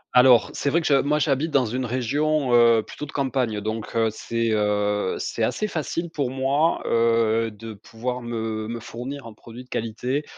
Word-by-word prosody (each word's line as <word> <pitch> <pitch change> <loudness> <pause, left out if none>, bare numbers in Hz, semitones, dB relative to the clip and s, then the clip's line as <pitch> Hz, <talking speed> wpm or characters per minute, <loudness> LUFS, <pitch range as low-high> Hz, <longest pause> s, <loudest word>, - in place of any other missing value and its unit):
Alors, 125 -2 +6
c'est 140 - -1
vrai 165 +4 +3
que 160 - -5
je 145 - +3
moi, 150 +2 +1
j'habite 150 +1 +1
dans 140 -4 +2
une 125 +3 -2
région, 135 +3 0
heu, 115 -2 +6
plutôt 150 - -8
de - - -10
campagne, 125 -6 -1
donc 110 +1 -4
heu, 115 -1 +3
c'est, 115 +1 -2
heu, 105 -2 +1
c'est - - -4
assez 215 - 0
facile 170 -1 -3
pour 140 -6 -1
moi, 135 +5 +1
heu, 115 -1 +2
de 110 +1 -9
pouvoir 120 +4 -5
me 110 -2 -3
me 115 0 -4
fournir 125 +4 -7
un 115 - -9
produit 120 +3 -11
de 125 - -25
qualité, 125 +6 -2
120 Hz, 190 wpm, -24 LUFS, 110-140 Hz, -, Alors